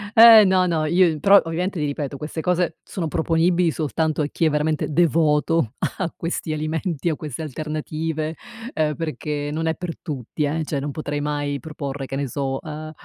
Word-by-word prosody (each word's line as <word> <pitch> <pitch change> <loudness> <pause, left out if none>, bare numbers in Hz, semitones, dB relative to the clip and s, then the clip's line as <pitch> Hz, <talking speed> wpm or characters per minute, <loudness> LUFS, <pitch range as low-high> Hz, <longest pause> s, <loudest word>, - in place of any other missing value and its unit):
Eh, 225 -2 +10
no, 185 -1 +3
no. 160 -2 0
Io 170 -1 +3
però 195 +4 +7
ovviamente 175 +4 -2
ti 150 - 0
ripeto, 145 -1 -3
queste 150 +2 -6
cose 180 0 0
sono 170 -4 -4
proponibili 170 +2 +2
soltanto 155 0 -1
a 145 - 0
chi 165 - 0
è 155 - +4
veramente 150 0 0
devoto 155 -4 +2 0.2
a 185 -3 -1
questi 165 -1 -3
alimenti, 160 +1 -2
a 155 - 0
queste 150 -2 -6
alternative, 155 +1 -3 0.4
uhm 155 -1 +1
perché 150 -2 -3
non 160 +2 -2
è 160 - +1
per 175 -2 -6
tutti, 150 -1 -4
eh. 155 +3 -1
Cioè, 145 -2 -2
non 145 +1 -3
potrei 145 0 -4
mai 145 -1 -2
proporre 140 -3 -5
che 135 - -5
ne 140 0 -2
so, 135 -1 -2
uhm, 155 0 -7
155 Hz, 185 wpm, -22 LUFS, 150-165 Hz, 0.4 s, Eh